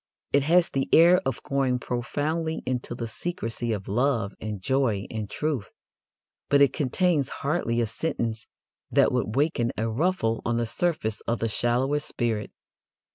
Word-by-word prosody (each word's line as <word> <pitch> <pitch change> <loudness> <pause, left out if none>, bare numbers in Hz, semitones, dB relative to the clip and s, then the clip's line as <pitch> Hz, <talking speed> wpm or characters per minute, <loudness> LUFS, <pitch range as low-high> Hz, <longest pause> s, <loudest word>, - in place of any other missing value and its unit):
It 140 - +5
has 170 +5 +4
the 135 -1 -1
air 175 +3 +7
of 135 - -3
going 135 -2 +1
profoundly 150 +7 -2
into 125 -1 -2
the 120 - -4
secrecies 115 -3 -3
of 100 -2 -8
love 115 -1 +1
and 105 -2 -4
joy 115 -2 +1
and 110 -3 -4
truth, 145 -2 -2 0.8
but 140 - +5
it 140 -2 +5
contains 150 +1 +1 0.2
hardly 140 -6 +1
a - - +2
sentence 115 -2 -3 0.4
that - - +4
would 105 - -1
waken 135 -5 +1
a 115 - 0
ruffle 115 -2 0
on 115 0 0
the 120 - 0
surface 115 -4 -1
of 115 - +1
the 115 - -1
shallowest 130 +6 0
spirit. 110 -4 -2
125 Hz, 155 wpm, -26 LUFS, 115-150 Hz, 0.8 s, air